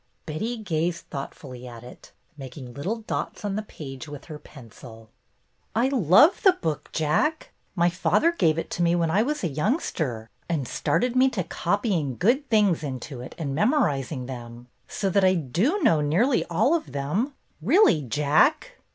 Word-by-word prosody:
Betty 215 Hz, +11 st, -3 dB
gazed 170 Hz, -4 st, -2 dB
thoughtfully 130 Hz, -2 st, -7 dB
at 120 Hz, -1 st, -10 dB
it, 125 Hz, -, -13 dB, 0.2 s
making 130 Hz, -2 st, -9 dB
little 195 Hz, -, -3 dB
dots 215 Hz, -, -4 dB
on 200 Hz, -1 st, -2 dB
the 215 Hz, -, -1 dB
page 140 Hz, -9 st, -9 dB
with 145 Hz, -1 st, -9 dB
her 155 Hz, -3 st, -9 dB
pencil. 115 Hz, -5 st, -14 dB, 0.6 s
"I 240 Hz, +4 st, +2 dB
love 265 Hz, -, +5 dB
the 380 Hz, -, +6 dB
book. 160 Hz, -, -4 dB
Jack. 165 Hz, -, 0 dB, 0.2 s
My 170 Hz, -2 st, +3 dB
father 180 Hz, -, +2 dB
gave 165 Hz, -, +1 dB
it 165 Hz, -, -4 dB
to -, -, -3 dB
me 170 Hz, 0 st, +3 dB
when 165 Hz, -2 st, +1 dB
I 200 Hz, +5 st, +3 dB
was 295 Hz, +3 st, -2 dB
a -, -, +2 dB
youngster, 150 Hz, -, -2 dB, 0.2 s
and 150 Hz, -7 st, -1 dB
started 235 Hz, -, 0 dB
me 260 Hz, +1 st, +5 dB
to 200 Hz, -8 st, -2 dB
copying 175 Hz, -, -1 dB
good 260 Hz, +9 st, +1 dB
things 210 Hz, -7 st, +3 dB
into 130 Hz, -2 st, -6 dB
it 125 Hz, -, -9 dB
and 145 Hz, -5 st, -3 dB
memoriz 155 Hz, -, +1 dB
ing 130 Hz, -5 st, -4 dB
them. 120 Hz, -1 st, -9 dB, 0.2 s
So 200 Hz, -, -2 dB
that 200 Hz, +1 st, +3 dB
I 185 Hz, 0 st, +5 dB
do 185 Hz, -, 0 dB
know 160 Hz, -, +4 dB
nearly 195 Hz, -, +2 dB
all 210 Hz, -, +2 dB
of 330 Hz, -2 st, -2 dB
them, 185 Hz, -, -2 dB, 0.3 s
really. 245 Hz, -, +4 dB
Jack." 150 Hz, -, +1 dB
165 Hz, 170 wpm, -25 LUFS, 140-225 Hz, 0.6 s, the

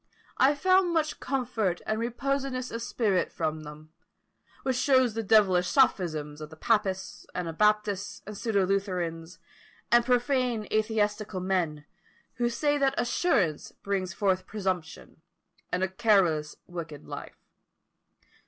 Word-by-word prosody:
I 275 Hz, +3 st, +5 dB
found 370 Hz, +2 st, +3 dB
much 310 Hz, -1 st, 0 dB
comfort 240 Hz, -9 st, -1 dB
and 215 Hz, 0 st, -1 dB
reposedness 255 Hz, +2 st, -2 dB
of 230 Hz, -, -4 dB
spirit 220 Hz, -5 st, 0 dB
from 155 Hz, -1 st, -2 dB
them, 155 Hz, +1 st, -11 dB, 0.7 s
which 260 Hz, -1 st, 0 dB
shows 260 Hz, -2 st, +3 dB
the 225 Hz, -, -2 dB
devilish 195 Hz, -4 st, +4 dB
sophisms 155 Hz, -, +1 dB
of 155 Hz, -, -7 dB
the 160 Hz, -, -12 dB
papists, 195 Hz, 0 st, -1 dB
anabaptists, 200 Hz, +3 st, 0 dB
and 210 Hz, -, -7 dB
pseudo 200 Hz, -3 st, +1 dB
Lutherans, 180 Hz, -4 st, -2 dB, 0.5 s
and 240 Hz, 0 st, +6 dB
profane 245 Hz, -2 st, +1 dB
atheistical 215 Hz, -2 st, 0 dB
men, 170 Hz, -6 st, -1 dB, 0.5 s
who 240 Hz, -1 st, +1 dB
say 290 Hz, +5 st, 0 dB
that 275 Hz, 0 st, +2 dB
assurance 215 Hz, -, +1 dB
brings 195 Hz, -2 st, -3 dB
forth 185 Hz, +1 st, 0 dB
presumption, 185 Hz, -5 st, -4 dB, 0.5 s
and 180 Hz, +1 st, 0 dB
a -, -, +2 dB
careless 185 Hz, -7 st, +2 dB
wicked 165 Hz, -4 st, -7 dB
life. -, -, -8 dB
205 Hz, 125 wpm, -28 LUFS, 180-240 Hz, 0.7 s, and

